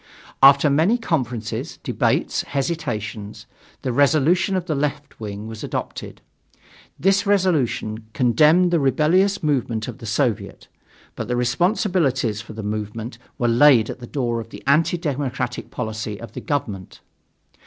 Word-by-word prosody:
After 140 +2 +7
many 160 +11 +3
conferences, 125 - -3
debates, - - 0
hesitations, 120 -9 -4 0.4
the 130 - -1
resolution 155 +8 +3
of 185 -2 -1
the 160 - -1
"left" 145 0 -3
wing 105 -1 -6
was 110 -1 -8
adopted. - - -5 0.8
This 195 +3 +2
resolution 145 - 0
condemned 150 +10 +4
the 170 - +3
rebellious 160 +9 +2
movement 125 -7 0
of 125 - -7
the 115 - -8
Soviet, 110 +1 -1 0.5
but - - -5
the 125 - -1
responsibilities 130 - +1
for 110 - -11
the 110 0 -7
movement 105 +3 -5 0.2
were 120 -3 +1
laid 120 -1 +5
at - - -9
the 120 - -9
door 120 -4 -1
of 115 - -11
the - - -11
anti 160 +5 +3
democratic 135 -6 -3
policy 110 -3 -4
of 115 - -9
the - - -7
government. 110 - -4
130 Hz, 140 wpm, -22 LUFS, 115-155 Hz, 0.8 s, After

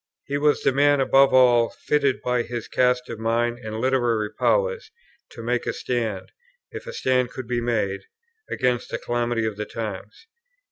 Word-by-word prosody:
He 140 0 -2
was 150 0 +2
the - - +4
man 145 +1 +3
above 135 +1 +5
all 125 -2 +5
others - - -17
fitted 140 -3 +1
by 125 -1 +1
his 120 -1 -5
cast 125 0 +1
of 115 - -7
mind 120 +1 0
and 110 -2 -6
literary 120 -4 +1
powers 485 -2 0 0.4
to 115 - -10
make 120 +1 -1
a - - 0
stand, 115 -6 -3 0.4
if - - -8
a - - -4
stand 125 - +1
could 130 -1 -8
be 120 0 -1
made, 105 -5 -1 0.4
against 125 -1 -1
the - - -3
calamity 120 -1 -1
of 110 -2 -3
the 105 - -3
times. 105 - -7
120 Hz, 180 wpm, -23 LUFS, 115-130 Hz, 0.4 s, above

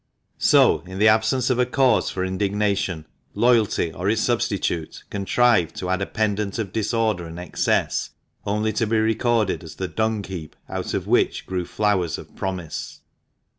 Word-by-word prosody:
So, - - +5
in 95 0 -7
the 105 +2 +4
absence 110 +4 +3
of 125 - +1
a 125 - +4
cause 130 0 +3
for 95 0 -2
indignation, 95 -3 -1 0.3
loyalty, 115 -8 +2
or 90 +5 -2
its 110 +1 +1
substitute, 100 -8 -1
contrived 100 -3 +2
to 90 0 -3
add 95 +1 0
a 95 - -1
pendant 105 -2 -1
of 105 -5 -4
disorder 110 -5 0
and 80 +1 -9
excess 90 0 0 0.3
only 105 +2 0
to 115 +1 0
be 110 +1 +1
recorded 110 -2 +1
as 80 -1 -10
the 95 - -3
dung 110 +1 -1
heap 85 -6 -7
out - - -4
of - - -2
which - - +1
grew 90 -2 -3
flowers 95 -6 0
of - - -12
promise. 95 -4 -5
105 Hz, 165 wpm, -23 LUFS, 95-110 Hz, 0.3 s, So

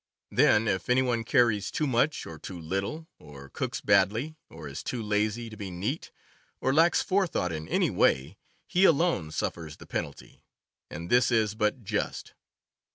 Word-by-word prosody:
Then 110 +2 +4
if 95 0 -1
any 130 +1 +4
one 120 -3 0
carries 115 -5 +2
too 155 - -1
much 135 +3 +1
or 80 -2 -9
too 90 +2 -8
little, 95 - -3
or 70 -2 -12
cooks - - -4
badly, 115 - +2
or 80 -2 -9
is 70 +1 -6
too 125 - -4
lazy 105 +2 0
to 110 - -9
be 100 -2 -6
neat, 100 - -4 0.5
or 130 - +1
lacks 165 +4 +4
forethought 185 - 0
in 80 -1 -5
any - - +1
way, 70 +9 +1 0.3
he 180 - +1
alone 165 - +3
suffers 80 0 -4
the - - -13
penalty; 70 - -6 0.5
and 85 +3 -7
this 125 +1 +5
is 110 -3 +2
but 110 +3 -1
just. - - -3
105 Hz, 165 wpm, -28 LUFS, 85-130 Hz, 0.5 s, this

